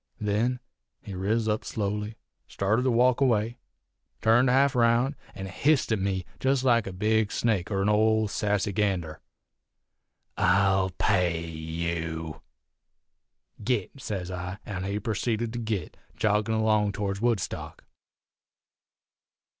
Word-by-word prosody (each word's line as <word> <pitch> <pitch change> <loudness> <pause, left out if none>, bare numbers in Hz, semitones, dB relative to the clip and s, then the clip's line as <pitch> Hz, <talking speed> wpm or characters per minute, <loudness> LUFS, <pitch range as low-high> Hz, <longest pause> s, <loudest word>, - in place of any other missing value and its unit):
Then 110 +5 0 0.4
he 100 - -7
riz 105 +5 0
up 105 0 0
slowly, 105 +1 -3 0.3
started 105 +5 0
to 130 - +1
walk 125 +2 +3
away, 120 -2 +1 0.6
turned 115 +3 +4
half 135 +2 +4
round, 120 +3 +3 0.2
an' 95 - -6
hissed 135 +8 +1
at 110 - +2
me 95 -1 -1
jest 135 0 +1
like 120 -5 +3
a - - -4
big 105 +3 +1
snake 105 -7 0
er 95 -2 0
'n - - +1
old 110 0 +3
sassy 105 -1 0
gander: 90 -7 -1 1.2
"'I'll 95 0 +3
pay 90 -5 +1
you!' 80 0 -4 1.2
"'Git!' 125 +3 -2
sez 95 -5 -4
I, 90 +1 -5
an' 95 -2 -4
he 100 +2 -2
purceeded 115 +1 -2
to 120 - -3
git, 110 -7 -3 0.2
joggin' 105 +1 +1
along 110 -2 +2
towards 100 0 -3
Woodstock. 115 -6 -2
105 Hz, 125 wpm, -27 LUFS, 95-115 Hz, 1.2 s, turned